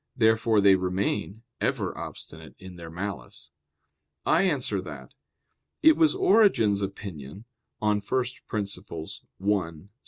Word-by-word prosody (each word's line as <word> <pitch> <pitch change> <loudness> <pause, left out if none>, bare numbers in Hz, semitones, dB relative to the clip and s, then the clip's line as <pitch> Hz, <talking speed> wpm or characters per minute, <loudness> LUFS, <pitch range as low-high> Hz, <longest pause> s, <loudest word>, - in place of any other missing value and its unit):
Therefore 110 -2 +3
they 100 -1 +7
remain 95 +3 -1 0.2
ever - - -1
obstinate - - -9
in 95 -1 -11
their 85 -1 -9
malice. 90 -6 -7 0.7
I - - +4
answer 135 - 0
that, 75 -7 -10 0.7
It 315 0 +8
was 320 +2 +3
Origen's 205 - +4
opinion 95 - -7 0.3
[*Peri 105 -1 +1
Archon 105 -8 -4 0.2
i. 95 -3 -1
100 Hz, 105 wpm, -26 LUFS, 90-115 Hz, 0.7 s, It